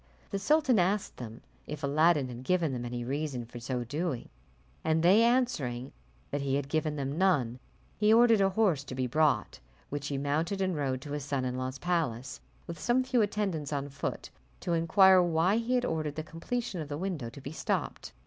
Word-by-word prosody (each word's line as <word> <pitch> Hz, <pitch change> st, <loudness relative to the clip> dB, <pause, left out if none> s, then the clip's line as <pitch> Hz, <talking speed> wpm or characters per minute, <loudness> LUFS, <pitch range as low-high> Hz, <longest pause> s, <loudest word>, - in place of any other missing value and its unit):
The 200 Hz, -, -1 dB
sultan 275 Hz, +1 st, +3 dB
asked 195 Hz, +3 st, 0 dB
them 115 Hz, -2 st, -8 dB, 0.3 s
if 150 Hz, 0 st, -6 dB
Aladdin 150 Hz, 0 st, +3 dB
had 125 Hz, 0 st, -8 dB
given 165 Hz, -2 st, +1 dB
them 120 Hz, -1 st, -4 dB
any 120 Hz, 0 st, -4 dB
reason 135 Hz, -1 st, -3 dB
for 120 Hz, +1 st, -9 dB
so 125 Hz, +1 st, -3 dB
doing, 145 Hz, +1 st, -3 dB, 0.5 s
and 160 Hz, 0 st, +1 dB
they 190 Hz, +6 st, +6 dB
answering 195 Hz, -, +1 dB, 0.4 s
that 145 Hz, -, -1 dB
he 135 Hz, -1 st, 0 dB
had 140 Hz, -1 st, -1 dB
given 155 Hz, 0 st, 0 dB
them 140 Hz, +2 st, -3 dB
none, 135 Hz, -11 st, +2 dB, 0.4 s
he 210 Hz, 0 st, +4 dB
ordered 230 Hz, -2 st, +6 dB
a 195 Hz, -, +4 dB
horse 190 Hz, -8 st, +2 dB
to 130 Hz, -, -7 dB
be 130 Hz, 0 st, -1 dB
brought, 140 Hz, -3 st, +1 dB, 0.3 s
which 145 Hz, 0 st, -3 dB
he 140 Hz, -, -2 dB
mounted, 155 Hz, +7 st, -1 dB
and 185 Hz, -2 st, 0 dB
rode 135 Hz, -3 st, -1 dB
to 145 Hz, -, -8 dB
his 145 Hz, -1 st, -3 dB
son 135 Hz, -2 st, -2 dB
in 125 Hz, 0 st, -2 dB
law's 130 Hz, +1 st, -3 dB
palace, 135 Hz, -8 st, -2 dB, 0.2 s
with 170 Hz, -, -7 dB
some 250 Hz, +2 st, +2 dB
few 255 Hz, -2 st, +2 dB
attendants 195 Hz, -8 st, -1 dB
on 140 Hz, -1 st, -2 dB
foot, 140 Hz, -, -5 dB, 0.3 s
to 170 Hz, -, -1 dB
inquire 185 Hz, +3 st, +6 dB
why 175 Hz, +4 st, +2 dB
he 235 Hz, +2 st, 0 dB
had 250 Hz, 0 st, +1 dB
ordered 155 Hz, -, -2 dB
the 155 Hz, -, -3 dB
completion 185 Hz, +4 st, -4 dB
of 150 Hz, -, -7 dB
the 145 Hz, -, -3 dB
window 165 Hz, -9 st, -3 dB
to 115 Hz, -, -11 dB
be 135 Hz, +1 st, -7 dB
stopped. 160 Hz, -, -3 dB
155 Hz, 200 wpm, -30 LUFS, 135-190 Hz, 0.5 s, they